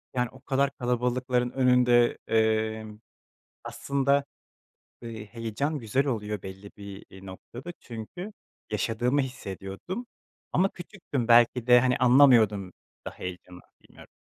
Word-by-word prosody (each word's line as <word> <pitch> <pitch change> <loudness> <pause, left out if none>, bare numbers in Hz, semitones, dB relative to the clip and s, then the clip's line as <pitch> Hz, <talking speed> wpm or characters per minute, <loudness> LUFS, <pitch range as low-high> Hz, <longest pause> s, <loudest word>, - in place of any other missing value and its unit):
Yani, 125 -2 0
o 130 - -15
kadar 140 0 +1
kalabalıkların 125 0 0
önünde, 125 -2 +4
emm, 110 -1 0 0.6
aslında, 140 0 0 0.8
eee, 115 -2 -7
heyecan 115 +7 -3
güzel 125 +5 0
oluyor 105 -6 -3
belli 95 +1 -10
bir, 100 -1 -10
iii, 95 0 -13
noktada 120 - -9
çünkü 120 - -8 0.4
yaşadığımı 120 +6 0
hissediyordum 125 - -6 0.5
ama 190 +2 +3
küçüktüm 175 - -5
belki 120 +1 +5
de, 125 0 +8
hani, 125 0 +2
anlamıyordum 120 -7 +5 0.4
da - - -4
heyecanı, 90 0 -8 0.2
bilmiyorum. - - -18
120 Hz, 115 wpm, -27 LUFS, 105-130 Hz, 0.8 s, de